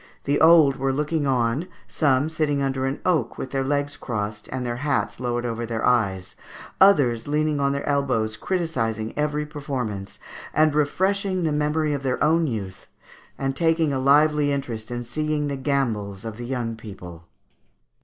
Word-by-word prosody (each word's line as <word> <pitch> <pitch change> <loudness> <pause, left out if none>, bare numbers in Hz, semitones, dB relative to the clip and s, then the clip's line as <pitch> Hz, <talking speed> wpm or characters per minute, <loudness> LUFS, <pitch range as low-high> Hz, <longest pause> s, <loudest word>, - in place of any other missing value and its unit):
The 145 +1 0
old 160 -4 +6
were 135 0 0
looking 150 +2 -1
on, 130 +5 +1 0.2
some 140 -2 +2
sitting 155 -3 0
under 135 -1 0
an 135 - -3
oak, 160 -10 +1
with 130 - -5
their 135 -1 0
legs 145 +1 -1
crossed, 105 -3 -4
and 130 -1 -4
their 120 0 -2
hats 140 -2 -1
lowered 120 -1 -2
over 115 0 -3
their 115 -1 -2
eyes, 100 -7 +1 0.5
others 140 - +5
leaning 150 0 +1
on 140 0 +2
their 140 0 -3
elbows 130 -7 0
criticizing 115 - -2
every 150 0 -1
performance, 130 -10 -5 0.4
and 155 -1 +4
refreshing 185 +5 +1
the 160 - +1
memory 150 +1 0
of 140 - -2
their 130 -2 -1
own 160 +1 +3
youth, 100 -7 -5 0.5
and 135 0 -2
taking 165 -1 +2
a 135 - 0
lively 145 +2 +4
interest 120 -6 -4
in 120 0 -4
seeing 150 +4 -2
the 140 - -2
gambols 115 -8 -2
of 110 -1 -6
the 120 0 -6
young 120 -3 -2
people." 90 -6 -11
140 Hz, 165 wpm, -24 LUFS, 120-150 Hz, 0.5 s, old